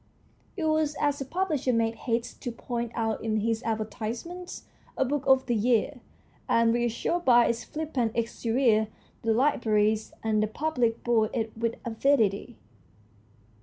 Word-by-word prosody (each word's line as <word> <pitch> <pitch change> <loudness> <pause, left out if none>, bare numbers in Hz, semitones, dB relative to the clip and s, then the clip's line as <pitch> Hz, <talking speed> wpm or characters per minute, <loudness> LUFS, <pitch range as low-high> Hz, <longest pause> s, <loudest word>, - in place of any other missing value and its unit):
It 340 - -2
was, 310 -1 +1
as 290 -1 +1
the 275 - -4
publisher 310 -4 0
made 230 -1 +1
haste 230 0 -3
to 245 - -3
point 235 0 -4
out 225 -1 -1
in 215 -1 0
his 225 +1 0
advertisements, 230 - -4 0.3
a 265 - +2
book 280 +1 -1
of 265 -1 +5
the 240 - 0
year, 235 +4 +1 0.5
and, 230 0 +4
reassured 240 +9 0
by 240 -4 +6
its 235 - -1
flippant 290 -8 -2
exterior, 230 -1 +1 0.3
the 225 - +1
libraries 220 -4 +2
and 215 -1 +1
the 215 - +1
public 240 -2 -1
bought 225 -3 +2
it 225 -1 -2
with 230 0 -1
avidity. 230 -2 +1
235 Hz, 145 wpm, -27 LUFS, 225-270 Hz, 0.5 s, by